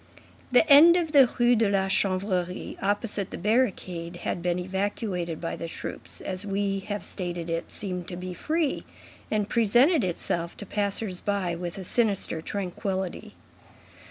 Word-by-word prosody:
The 250 +5 +5
end 320 +4 +9
of 330 -3 -1
the 275 -5 +7
Rue 240 0 +5
de 220 -2 +2
la 195 -1 +1
Chanvrerie, 185 -2 -1
opposite 205 0 -1
the - - -6
barricade, 185 -5 0
had 175 - -2
been 175 0 0
evacuated 185 -2 -2
by 165 - -3
the 165 - -5
troops, - - -6
as 185 0 -3
we 200 -1 -1
have 205 +1 -5
stated, 175 -3 -4
it 165 0 -3
seemed 180 -3 -4
to 180 - -5
be 180 0 -5
free, 310 - -1 0.5
and 210 -2 0
presented 240 - +4
itself 170 -1 -2
to 205 - -7
passers 200 -1 -2
by 200 -4 -1
with 175 +1 -5
a 190 - -5
sinister 200 -5 +1
tranquillity. 190 0 -4
195 Hz, 155 wpm, -27 LUFS, 180-215 Hz, 0.5 s, end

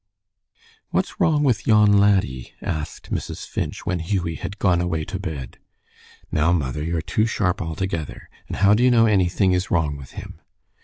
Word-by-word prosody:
"What's - - -2
wrong 160 -5 +3
with 120 -7 +1
yon 105 -2 +5
laddie?" 95 -12 +1
asked 75 -2 -5
Mrs. - - -4
Finch, - - -4
when 90 -2 -1
Hughie 85 -1 -1
had 100 +5 -6
gone 90 -4 +2
away 80 -3 -1
to 100 -2 -5
bed. 80 -10 -6 0.7
"Now, 75 +3 +2
mother, 75 -4 -1
you're 85 0 -2
too 110 +6 +1
sharp 100 -2 0
altogether. 80 -2 -4 0.2
And - - -5
how 100 +2 +5
do 110 - +2
you 125 - +5
know 115 -2 +5
anything 95 -2 +2
is 90 +1 -1
wrong 75 -4 0
with 70 -2 -12
him?" - - -9
90 Hz, 170 wpm, -22 LUFS, 80-105 Hz, 0.7 s, yon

